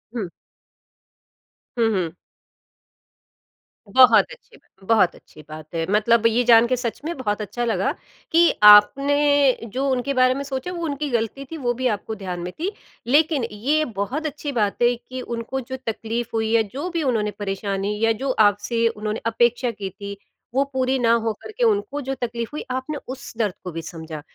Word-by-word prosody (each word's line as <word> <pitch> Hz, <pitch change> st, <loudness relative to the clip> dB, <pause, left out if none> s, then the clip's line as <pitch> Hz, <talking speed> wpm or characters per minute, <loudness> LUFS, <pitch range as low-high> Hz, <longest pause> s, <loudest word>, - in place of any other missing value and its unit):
हुँ। 215 Hz, -6 st, -2 dB, 1.5 s
हुँ, 230 Hz, -1 st, +3 dB
हुँ। 170 Hz, -4 st, -1 dB, 1.7 s
बहुत 255 Hz, +5 st, +6 dB
अच्छी -, -, -15 dB
बात 190 Hz, -, -27 dB
बहुत 210 Hz, -6 st, +3 dB
अच्छी 155 Hz, -, -16 dB
बात 155 Hz, +1 st, -10 dB
है। 165 Hz, 0 st, 0 dB
मतलब 225 Hz, +2 st, +3 dB
ये 230 Hz, +2 st, +2 dB
जान 235 Hz, -1 st, +6 dB
के 255 Hz, -, +1 dB
सच 235 Hz, -2 st, -3 dB
में 340 Hz, +2 st, -3 dB
बहुत 210 Hz, -5 st, -2 dB
अच्छा 210 Hz, +4 st, -3 dB
लगा, 230 Hz, -, 0 dB, 0.4 s
कि 335 Hz, +1 st, +5 dB
आपने 275 Hz, +6 st, +6 dB, 0.2 s
जो 270 Hz, +2 st, -1 dB
उनके 260 Hz, +1 st, 0 dB
बारे 255 Hz, -1 st, +4 dB
में 275 Hz, +2 st, -4 dB
सोचा, 275 Hz, +5 st, -4 dB
वो 345 Hz, -1 st, -5 dB
उनकी 290 Hz, 0 st, -3 dB
गलती 235 Hz, +3 st, -2 dB
थी, 325 Hz, +4 st, -8 dB
वो 245 Hz, -4 st, -1 dB
भी 255 Hz, +1 st, -1 dB
आपको 220 Hz, 0 st, -3 dB
ध्यान 185 Hz, -3 st, -5 dB
में 175 Hz, +1 st, -5 dB
थी। 365 Hz, +5 st, -1 dB, 0.4 s
लेकिन 295 Hz, +1 st, +3 dB
ये 285 Hz, +9 st, 0 dB, 0.2 s
बहुत 280 Hz, +10 st, -3 dB
अच्छी 295 Hz, -1 st, -4 dB
बात 215 Hz, -5 st, -1 dB
है 240 Hz, 0 st, +4 dB
कि 255 Hz, +2 st, -8 dB
उनको 240 Hz, +2 st, -4 dB
जो 260 Hz, +2 st, -6 dB
तकलीफ 225 Hz, +1 st, -3 dB
हुई, 220 Hz, -1 st, 0 dB
या 230 Hz, -, +5 dB
जो 295 Hz, +7 st, -3 dB
भी 335 Hz, -2 st, -2 dB
उन्होंने 220 Hz, -6 st, 0 dB
परेशानी 200 Hz, 0 st, -2 dB
या 225 Hz, -, +3 dB
जो 275 Hz, -, +1 dB, 0.2 s
आपसे 230 Hz, +3 st, 0 dB
उन्होंने 215 Hz, -1 st, -3 dB
अपेक्षा 240 Hz, +2 st, +1 dB
की 205 Hz, -3 st, -6 dB
थी, 200 Hz, +1 st, -8 dB, 0.4 s
वो 270 Hz, +2 st, +3 dB
पूरी 260 Hz, 0 st, +1 dB
ना 230 Hz, -1 st, +3 dB
हो 230 Hz, -1 st, +1 dB
करके 440 Hz, +3 st, -4 dB
उनको 410 Hz, -9 st, +1 dB
जो 270 Hz, 0 st, -3 dB
तकलीफ 235 Hz, -1 st, -3 dB
हुई, 300 Hz, -, -4 dB
आपने 260 Hz, +4 st, -3 dB
उस 265 Hz, +1 st, -8 dB
दर्द 210 Hz, -5 st, 0 dB
को 180 Hz, -, -5 dB
भी 165 Hz, 0 st, -5 dB
समझा। 160 Hz, -3 st, -8 dB
235 Hz, 180 wpm, -22 LUFS, 210-275 Hz, 1.7 s, बहुत